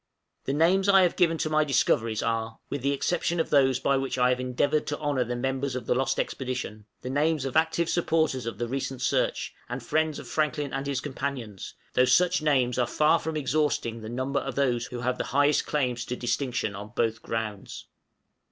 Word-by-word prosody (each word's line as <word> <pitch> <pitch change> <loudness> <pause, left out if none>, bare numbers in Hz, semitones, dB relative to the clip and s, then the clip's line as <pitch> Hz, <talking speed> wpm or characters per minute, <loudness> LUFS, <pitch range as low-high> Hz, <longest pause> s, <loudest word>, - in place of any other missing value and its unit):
The 135 - -1
names 185 +6 +3
I 195 -1 +7
have 175 - +2
given 165 -2 +3
to 155 - -1
my 155 0 +4
discoveries 115 -5 +1
are, 115 -1 -2
with 140 - -2
the 140 +2 +1
exception 170 +4 0
of 160 - -1
those 135 -3 +4
by 140 +1 +2
which 135 -1 -2
I 125 0 +4
have 125 0 +1
endeavored 130 +4 0
to 145 - -2
honor 145 -4 0
the 120 +1 -4
members 135 +1 -2
of 125 -3 -4
the - - +2
lost 135 +1 0
expedition, 125 -5 -4 0.2
the 125 - -4
names 150 0 +1
of 135 - -4
active 160 +1 +2
supporters 160 -8 +1
of 115 -4 -4
the 120 +2 -2
recent 130 0 -3
search, - - 0 0.2
and 125 0 -5
friends 155 +3 0
of 135 - -9
Franklin 150 +1 -1
and 135 +1 -3
his 135 -2 -1
companions, 135 -8 -5 0.2
though 125 - +4
such 175 +7 +3
names 130 -5 +2
are 120 - +2
far 155 +6 +3
from 160 0 -3
exhausting 135 -5 0
the 110 - -7
number 130 +3 -1
of 135 - -5
those 125 -4 +1
who 120 -1 -6
have 125 +1 -1
the - - -1
highest 145 +1 +3
claims 125 -5 0
to 125 - -3
distinction 125 -4 -2
on 105 +3 -9
both 115 -1 0
grounds. 110 -3 -5
135 Hz, 205 wpm, -27 LUFS, 120-150 Hz, 0.2 s, I